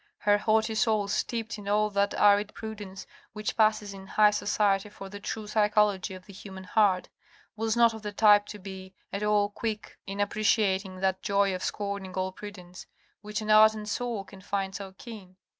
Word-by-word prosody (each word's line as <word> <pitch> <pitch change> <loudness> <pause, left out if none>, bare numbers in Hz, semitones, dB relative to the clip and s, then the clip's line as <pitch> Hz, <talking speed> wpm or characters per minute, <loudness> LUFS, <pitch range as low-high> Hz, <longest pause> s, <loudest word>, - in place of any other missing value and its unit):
Her 205 0 +3
haughty 220 +1 +2
soul 215 -2 +1
steeped 225 +1 -2
in 200 - -10
all 210 +1 +2
that 200 0 +1
arid 205 0 +4
prudence, 205 -3 -7 0.3
which 210 0 -3
passes 215 -2 +2
in 195 0 -11
high 210 +1 +4
society 205 -1 +1
for 195 -1 -10
the 205 +1 -8
true 215 +2 -5
psychology 210 -3 +1
of 185 0 -12
the 200 - -13
human 190 -1 -10
heart, 190 -1 +2 0.5
was 225 +1 -1
not 235 -1 +5
of 220 - -8
the 210 -1 -5
type 205 0 +5
to 210 - -7
be 190 -1 -10 0.2
at 200 - -3
all 210 -1 +2
quick 215 0 -5
in 195 +1 -5
appreciating 200 -2 +1
that 190 -1 0
joy 200 -1 +2
of 185 - -4
scorning 200 -2 -4
all 185 0 -1
prudence, 185 -2 -10 0.3
which 210 +1 -4
an 215 0 -1
ardent 215 0 +5
soul 235 -2 -2
can 190 0 -14
find 195 0 -2
so 195 -1 -7
keen. 200 -6 -11
205 Hz, 185 wpm, -28 LUFS, 195-215 Hz, 0.5 s, not